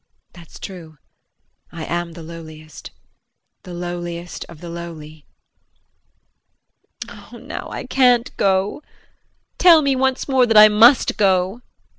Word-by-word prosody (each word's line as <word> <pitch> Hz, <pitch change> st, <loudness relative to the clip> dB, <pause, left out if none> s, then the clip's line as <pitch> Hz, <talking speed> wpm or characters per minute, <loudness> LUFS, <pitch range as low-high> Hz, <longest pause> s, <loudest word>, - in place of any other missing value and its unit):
That's 170 Hz, -2 st, -15 dB
true, 165 Hz, -5 st, -10 dB, 0.7 s
I 165 Hz, -2 st, -7 dB
am 170 Hz, 0 st, -4 dB
the 165 Hz, -, -11 dB
lowliest 155 Hz, -1 st, -11 dB, 0.7 s
the 180 Hz, -, -12 dB
lowliest 175 Hz, 0 st, -6 dB
of 170 Hz, -, -13 dB
the 175 Hz, -, -10 dB
lowly. 155 Hz, -3 st, -10 dB, 1.8 s
Oh, -, -, -13 dB
now -, -, -8 dB
I -, -, -6 dB
can't 250 Hz, -2 st, +2 dB
go. 195 Hz, +5 st, 0 dB, 0.8 s
Tell 335 Hz, -4 st, +6 dB
me 275 Hz, -1 st, +1 dB
once 265 Hz, 0 st, -1 dB
more 260 Hz, -3 st, +2 dB
that 225 Hz, -2 st, +3 dB
I 215 Hz, 0 st, +9 dB
must 230 Hz, +5 st, +4 dB
go. 190 Hz, 0 st, +1 dB
JEAN. 245 Hz, -, -35 dB
180 Hz, 125 wpm, -19 LUFS, 170-235 Hz, 1.8 s, I